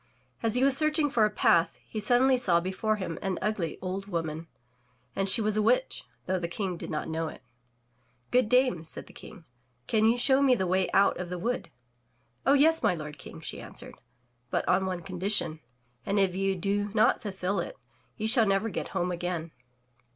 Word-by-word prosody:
As 225 Hz, 0 st, 0 dB
he 250 Hz, -, +2 dB
was 275 Hz, -1 st, +4 dB
searching 305 Hz, 0 st, +2 dB
for 225 Hz, -5 st, +4 dB
a -, -, +2 dB
path, 170 Hz, -4 st, +2 dB
he 215 Hz, -, -5 dB
suddenly 245 Hz, +5 st, +4 dB
saw 190 Hz, -9 st, +3 dB
before 190 Hz, +5 st, -1 dB
him 180 Hz, -5 st, -5 dB
an 195 Hz, -3 st, -2 dB
ugly 190 Hz, -6 st, -2 dB
old 190 Hz, +2 st, -4 dB
woman, 165 Hz, -3 st, -3 dB, 0.7 s
and 195 Hz, 0 st, +2 dB
she 225 Hz, -, +6 dB
was 215 Hz, 0 st, 0 dB
a 215 Hz, -, +2 dB
witch, -, -, +1 dB, 0.2 s
though 185 Hz, 0 st, 0 dB
the 170 Hz, -, -3 dB
King 185 Hz, +1 st, -3 dB
did -, -, -7 dB
not 155 Hz, -, -3 dB
know 160 Hz, 0 st, -2 dB
it. 135 Hz, -, -10 dB, 0.9 s
"Good 250 Hz, -3 st, +3 dB
dame, 250 Hz, -9 st, +3 dB
said 160 Hz, -, -8 dB
the -, -, -16 dB
King, 170 Hz, -, -12 dB, 0.4 s
"can 220 Hz, -, +2 dB
you 230 Hz, +2 st, +4 dB
show 265 Hz, +2 st, +3 dB
me 265 Hz, -3 st, +5 dB
the 190 Hz, -, -1 dB
way 185 Hz, +1 st, +1 dB
out 200 Hz, 0 st, +3 dB
of 180 Hz, -1 st, -4 dB
the 180 Hz, -, -4 dB
wood?'* 235 Hz, +8 st, -2 dB, 0.8 s
"Oh, 275 Hz, -, +6 dB
yes, 315 Hz, +3 st, +4 dB
my 180 Hz, -, +2 dB
lord 150 Hz, -2 st, -8 dB
King," -, -, -10 dB
she -, -, -7 dB
answered, -, -, -8 dB, 0.6 s
"but -, -, -1 dB
on 190 Hz, +1 st, +2 dB
one 180 Hz, -2 st, -4 dB
condition, 180 Hz, -3 st, -1 dB, 0.4 s
and 200 Hz, -, -1 dB
if 195 Hz, -2 st, +3 dB
you 195 Hz, 0 st, 0 dB
do 200 Hz, +3 st, -1 dB
not 215 Hz, -, +4 dB
fulfill 195 Hz, -2 st, -2 dB
it, -, -, -5 dB, 0.4 s
you 220 Hz, -1 st, -1 dB
shall 225 Hz, -1 st, +4 dB
never 195 Hz, +3 st, +1 dB
get 195 Hz, -, -4 dB
home 180 Hz, +1 st, 0 dB
again. 175 Hz, -2 st, -3 dB
195 Hz, 200 wpm, -28 LUFS, 175-230 Hz, 0.9 s, she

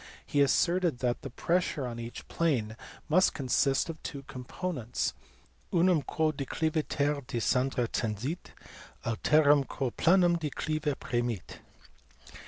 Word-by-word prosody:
He 145 Hz, -, +1 dB
asserted 170 Hz, +2 st, +3 dB
that 125 Hz, -1 st, -1 dB
the 135 Hz, -, -6 dB
pressure 165 Hz, 0 st, 0 dB
on 120 Hz, -1 st, -5 dB
each 115 Hz, 0 st, -7 dB
plane 125 Hz, -10 st, 0 dB, 0.3 s
must 185 Hz, +5 st, +4 dB
consist 135 Hz, 0 st, +2 dB
of 165 Hz, -1 st, -7 dB
two 140 Hz, -3 st, -6 dB
components, 130 Hz, 0 st, -3 dB, 0.3 s
" 60 Hz, +3 st, -35 dB
unum 175 Hz, -2 st, +4 dB
quo 155 Hz, +3 st, 0 dB
decliviter 150 Hz, 0 st, -1 dB
de -, -, -3 dB
scendere 125 Hz, +1 st, +1 dB
tendit, 115 Hz, -, -3 dB, 0.6 s
alterum 145 Hz, +4 st, +4 dB
quo 130 Hz, -4 st, -2 dB
planum 175 Hz, +2 st, +4 dB
declive 155 Hz, -1 st, -2 dB
premit." 120 Hz, -5 st, -3 dB
140 Hz, 120 wpm, -30 LUFS, 125-160 Hz, 0.6 s, must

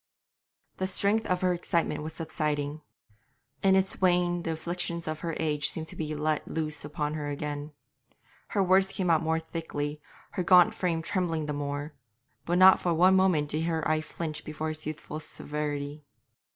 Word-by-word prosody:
The 190 Hz, -, -1 dB
strength 200 Hz, +4 st, +1 dB
of 180 Hz, -1 st, 0 dB
her 180 Hz, -1 st, +3 dB
excitement 170 Hz, -3 st, 0 dB
was 155 Hz, +1 st, -5 dB
subsiding. 150 Hz, -2 st, -2 dB, 0.8 s
In 190 Hz, -1 st, +5 dB
its 190 Hz, 0 st, +1 dB
wane 175 Hz, -1 st, +3 dB
the 165 Hz, -1 st, -2 dB
afflictions 170 Hz, +1 st, -3 dB
of 155 Hz, 0 st, -3 dB
her 165 Hz, +1 st, -3 dB
age 150 Hz, -2 st, +1 dB
seemed 160 Hz, -1 st, -3 dB
to -, -, -10 dB
be 155 Hz, -1 st, -3 dB
let 150 Hz, 0 st, -1 dB
loose 155 Hz, -1 st, -3 dB
upon 150 Hz, 0 st, -3 dB
her 150 Hz, -2 st, -3 dB
again. 145 Hz, +1 st, -4 dB, 0.8 s
Her 200 Hz, -, +1 dB
words 190 Hz, +1 st, +4 dB
came 190 Hz, -, -2 dB
more 160 Hz, 0 st, +2 dB
thickly, 150 Hz, -2 st, -4 dB, 0.3 s
her 185 Hz, -, -2 dB
gaunt 180 Hz, 0 st, +6 dB
frame 165 Hz, -3 st, -1 dB
trembled 165 Hz, -3 st, 0 dB
the 150 Hz, -, -2 dB
more, 145 Hz, +1 st, -4 dB, 0.5 s
but 175 Hz, +1 st, +2 dB
not 190 Hz, +1 st, +8 dB
for 175 Hz, -2 st, 0 dB
one 185 Hz, +3 st, +6 dB
moment 180 Hz, -6 st, +3 dB
did 155 Hz, +2 st, -1 dB
her 160 Hz, -2 st, 0 dB
eye 155 Hz, 0 st, +2 dB
flinch 155 Hz, 0 st, -5 dB
before 155 Hz, +1 st, -4 dB
his 155 Hz, -1 st, -5 dB
youthful 155 Hz, 0 st, -5 dB
severity. 150 Hz, -1 st, -4 dB
160 Hz, 170 wpm, -28 LUFS, 150-175 Hz, 0.8 s, not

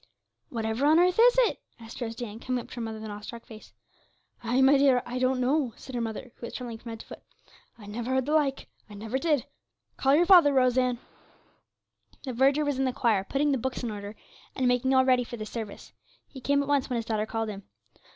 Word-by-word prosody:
'Whatever 225 Hz, +3 st, -1 dB
on 310 Hz, +2 st, +5 dB
earth 360 Hz, +3 st, +3 dB
is -, -, +6 dB
it?' 480 Hz, -, 0 dB, 0.3 s
said 230 Hz, -, -10 dB
Rose 230 Hz, 0 st, -4 dB
Ann, 220 Hz, -1 st, -7 dB
coming 250 Hz, 0 st, -3 dB
up -, -, -17 dB
to -, -, -10 dB
her -, -, -3 dB
mother 225 Hz, -1 st, -4 dB
with 220 Hz, -, -8 dB
an 215 Hz, -, -6 dB
awestruck 215 Hz, +3 st, -9 dB
face. 220 Hz, -1 st, -13 dB, 0.7 s
'Ay, 240 Hz, +3 st, +1 dB
my 265 Hz, +2 st, +6 dB
dear, 270 Hz, -3 st, +4 dB
I 250 Hz, +1 st, -4 dB
don't 255 Hz, 0 st, +1 dB
know,' 260 Hz, -1 st, +1 dB
said 265 Hz, -, -11 dB
her 240 Hz, -, -2 dB
mother, 230 Hz, +2 st, -5 dB
who 235 Hz, -, -7 dB
was -, -, -10 dB
trembling 235 Hz, -3 st, -6 dB
from 235 Hz, -, -10 dB
head 225 Hz, -1 st, -7 dB
to -, -, -14 dB
foot. -, -, -11 dB, 0.6 s
'I 215 Hz, -, -13 dB
never 225 Hz, +4 st, -5 dB
heard 260 Hz, -1 st, +1 dB
the 300 Hz, -, -1 dB
like; 285 Hz, -3 st, +1 dB, 0.2 s
I 205 Hz, -, -11 dB
never 220 Hz, +5 st, -3 dB
did. 300 Hz, -4 st, +1 dB, 0.5 s
Call 270 Hz, +1 st, +3 dB
your 345 Hz, +3 st, +4 dB
father, 345 Hz, -6 st, +7 dB
Rose 255 Hz, -2 st, +3 dB
Ann.' 250 Hz, -1 st, +1 dB, 1.3 s
The 260 Hz, -, -5 dB
verger 275 Hz, +5 st, +3 dB
was 285 Hz, -2 st, -1 dB
in 270 Hz, -, +2 dB
the 255 Hz, -, -1 dB
choir, 220 Hz, -6 st, +1 dB
putting 285 Hz, +7 st, 0 dB
the 270 Hz, -, 0 dB
books 260 Hz, +1 st, -4 dB
in 235 Hz, -, -2 dB
order, 205 Hz, 0 st, -7 dB, 0.4 s
and 260 Hz, -2 st, +1 dB
making 250 Hz, +1 st, +2 dB
all 260 Hz, 0 st, +5 dB
ready 255 Hz, -1 st, +3 dB
for 240 Hz, 0 st, -8 dB
the 215 Hz, -, -5 dB
service. 215 Hz, -2 st, -8 dB, 0.3 s
He 265 Hz, -, -11 dB
came 285 Hz, +2 st, +2 dB
at -, -, -7 dB
once 285 Hz, -2 st, +1 dB
when 250 Hz, -, -1 dB
his 230 Hz, -, -3 dB
daughter 220 Hz, -1 st, -1 dB
called 225 Hz, -1 st, -3 dB
him. 200 Hz, -1 st, -7 dB
250 Hz, 240 wpm, -27 LUFS, 225-270 Hz, 1.3 s, father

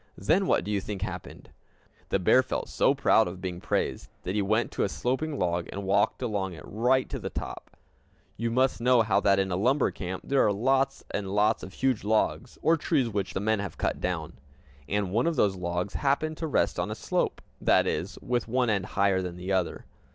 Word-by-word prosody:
Then 175 Hz, -, +2 dB
what -, -, +2 dB
do 105 Hz, -, -4 dB
you 100 Hz, -2 st, 0 dB
think 100 Hz, -1 st, -5 dB
happened! -, -, -7 dB, 0.6 s
The -, -, +2 dB
bear 100 Hz, +7 st, +5 dB
felt 130 Hz, -, -4 dB
so 140 Hz, -, +3 dB
proud 110 Hz, -6 st, +4 dB
of 90 Hz, +1 st, -7 dB
being 90 Hz, -1 st, -5 dB
praised -, -, -2 dB
that 90 Hz, -, -3 dB
he 105 Hz, -, +1 dB
went 110 Hz, +4 st, +1 dB
to -, -, -3 dB
a -, -, 0 dB
sloping 140 Hz, +8 st, -2 dB
log, 85 Hz, -3 st, -1 dB
and 100 Hz, -, -5 dB
walked 95 Hz, +6 st, +1 dB
along 100 Hz, -5 st, -2 dB
it 80 Hz, -, -10 dB
right 125 Hz, +5 st, +1 dB
to -, -, -4 dB
the -, -, -4 dB
top. -, -, -7 dB, 0.6 s
You 115 Hz, +1 st, -2 dB
must 130 Hz, +1 st, +1 dB
know 125 Hz, -1 st, +5 dB
that 100 Hz, -1 st, +3 dB
in 95 Hz, -1 st, 0 dB
a -, -, +1 dB
lumber 125 Hz, +9 st, +2 dB
camp 95 Hz, -1 st, -5 dB
there 135 Hz, -1 st, +3 dB
are 105 Hz, -, +3 dB
lots 135 Hz, +6 st, +1 dB
and 100 Hz, -1 st, -2 dB
lots 105 Hz, +3 st, +2 dB
of 95 Hz, -, -9 dB
huge 130 Hz, -4 st, 0 dB
logs, 110 Hz, +3 st, 0 dB
or 165 Hz, +1 st, +4 dB
trees 145 Hz, -6 st, +1 dB
which 100 Hz, -3 st, -3 dB
the -, -, +1 dB
men 110 Hz, +1 st, +1 dB
have 100 Hz, -2 st, -5 dB
cut -, -, -1 dB
down. -, -, -2 dB, 0.6 s
And 100 Hz, -2 st, 0 dB
one 115 Hz, -, +2 dB
of 170 Hz, -, +1 dB
these 100 Hz, -7 st, +3 dB
logs 90 Hz, +2 st, -3 dB
happened 155 Hz, +3 st, 0 dB
to 160 Hz, -, -3 dB
rest 150 Hz, -, +1 dB
on -, -, -1 dB
a -, -, -3 dB
slope, -, -, -1 dB, 0.2 s
that -, -, +4 dB
is, 95 Hz, +2 st, -2 dB
with 120 Hz, -2 st, -1 dB
one 125 Hz, 0 st, +1 dB
end 100 Hz, -2 st, -1 dB
higher 100 Hz, -1 st, +3 dB
than 90 Hz, -1 st, -5 dB
the 90 Hz, +2 st, -5 dB
other. 95 Hz, -3 st, -1 dB
105 Hz, 215 wpm, -28 LUFS, 95-130 Hz, 0.6 s, bear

